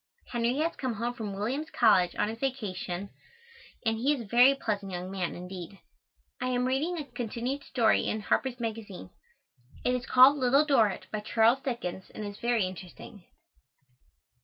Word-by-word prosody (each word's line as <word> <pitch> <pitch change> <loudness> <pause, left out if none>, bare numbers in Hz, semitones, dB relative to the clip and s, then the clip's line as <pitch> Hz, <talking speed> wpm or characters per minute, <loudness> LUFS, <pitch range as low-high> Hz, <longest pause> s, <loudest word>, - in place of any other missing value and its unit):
Henry 240 +2 0
has 325 +3 0
come 255 -4 -2
home 235 +3 -2
from 220 -4 -5
Williams 260 +10 -2
College 190 - +4
on - - +1
his 225 +1 -5
vacation 200 -7 -3 0.7
and 225 0 +1
he 275 +5 +3
is 260 - -6
a - - -8
very 245 +6 +6
pleasant 205 -6 -3
young 180 +1 -5
man, 185 -3 -3
indeed. 180 +1 -8 0.6
I 255 - 0
am 250 0 0
reading 290 +7 0
a 300 - -4
continued 245 +2 -4
story 235 -5 +2
in 215 - -1
Harper's 250 +3 0
Magazine. 225 -4 -6 0.7
It 250 - +3
is 250 0 -3
called 260 +3 +7
Little 270 +4 +4
Dorritt, 230 -9 +2
by 215 - -2
Charles 225 +4 +3
Dickens, 230 -8 -4
and 215 - -5
is 205 0 -7
very 235 -4 +1
interesting. 185 +1 -10
235 Hz, 165 wpm, -29 LUFS, 200-260 Hz, 0.7 s, called